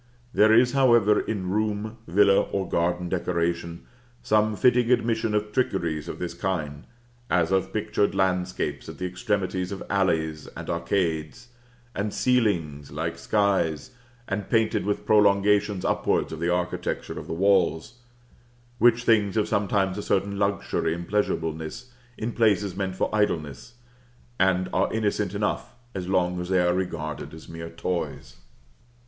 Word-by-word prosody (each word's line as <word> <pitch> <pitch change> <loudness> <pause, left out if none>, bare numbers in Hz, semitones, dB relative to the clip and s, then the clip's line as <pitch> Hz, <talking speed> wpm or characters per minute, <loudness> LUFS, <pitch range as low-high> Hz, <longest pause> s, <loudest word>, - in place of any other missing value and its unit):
There 110 +1 +5
is, 120 +2 +5
however, 120 -6 +4
in 95 -4 -3
room, 110 +1 -1
villa, 100 +3 +5
or 95 -2 -3
garden 90 +1 0
decoration, 85 -1 -2 0.4
some 110 0 +2
fitting 125 +2 +3
admission 115 -3 +1
of 105 0 -1
trickeries 85 - -1
of - - -5
this 85 -1 -4
kind, 80 -5 -3 0.4
as 85 -1 +2
of 95 0 +1
pictured 105 -2 0
landscapes 90 -6 -1
at - - -9
the 90 - -4
extremities 95 -1 -2
of 100 - -5
alleys 80 -6 0
and - - -5
arcades, 85 +6 -2 0.4
and 100 +1 -2
ceilings 85 - +1
like 80 +3 -4
skies, 95 - 0 0.4
or 100 - -1
painted 110 0 0
with 105 - -1
prolongations 100 -1 +3
upwards - - 0
of - - -6
the 85 +1 0
architecture 90 0 -2
of - - -9
the - - -4
walls, 95 +2 +1 0.8
which 120 0 +4
things 105 -4 +3
have 105 -2 +1
sometimes 100 -1 0
a - - -2
certain 100 0 -1
luxury 100 -4 0
and 85 0 -7
pleasureableness 80 +2 -2 0.3
in 115 +2 -3
places 105 -5 +2
meant 95 -1 -3
for - - 0
idleness, 80 - -1 0.6
and 95 -1 +2
are 95 - +1
innocent 105 -2 -1
enough 105 +3 -2 0.2
as 90 -2 -5
long 90 -1 +1
as 90 - -6
they 95 -1 +3
are 90 0 +3
regarded 85 -5 -4
as 80 - -12
mere 80 0 -7
toys. 85 +1 -4
95 Hz, 145 wpm, -25 LUFS, 85-105 Hz, 0.8 s, There